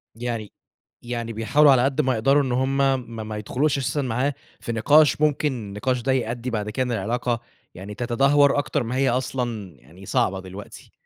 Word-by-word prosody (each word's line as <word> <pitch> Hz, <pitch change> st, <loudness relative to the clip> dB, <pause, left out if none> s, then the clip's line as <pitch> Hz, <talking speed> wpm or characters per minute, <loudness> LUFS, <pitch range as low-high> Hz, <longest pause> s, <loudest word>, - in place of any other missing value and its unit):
يعني 115 Hz, -3 st, -4 dB, 0.5 s
يعني 120 Hz, -1 st, -4 dB
بيحاولوا 140 Hz, +7 st, +4 dB
على 125 Hz, -2 st, +4 dB
قد 135 Hz, +3 st, +1 dB
ما 130 Hz, -2 st, +1 dB
يقدروا 135 Hz, +5 st, +3 dB
إن 130 Hz, -, -2 dB
هُم 130 Hz, +2 st, 0 dB
م 125 Hz, -5 st, -1 dB
ما 110 Hz, -1 st, -5 dB
يدخلوش 135 Hz, +8 st, 0 dB
أساسًا 135 Hz, +2 st, -1 dB
معاه 130 Hz, +3 st, -1 dB, 0.3 s
في 115 Hz, -, -5 dB
نقاش، 145 Hz, +7 st, +4 dB
ممكن 150 Hz, -1 st, +2 dB
النقاش 120 Hz, +3 st, -3 dB
ده 135 Hz, -, 0 dB
يأدّي 120 Hz, -1 st, -2 dB
بعد 105 Hz, -3 st, -3 dB
كده 130 Hz, +4 st, -1 dB
إن 125 Hz, -, -3 dB
العلاقة، 115 Hz, +2 st, -1 dB, 0.3 s
يعني 100 Hz, +3 st, -8 dB
تتدهور 135 Hz, +5 st, +3 dB
أكتر 135 Hz, -3 st, -1 dB
ما 120 Hz, +2 st, -4 dB
هي 135 Hz, 0 st, +2 dB
أصلًا 120 Hz, -, -3 dB
يعني 85 Hz, +10 st, -16 dB
صعبة 95 Hz, 0 st, 0 dB
دلوقتي. 95 Hz, +2 st, -11 dB
125 Hz, 180 wpm, -23 LUFS, 110-135 Hz, 0.5 s, بيحاولوا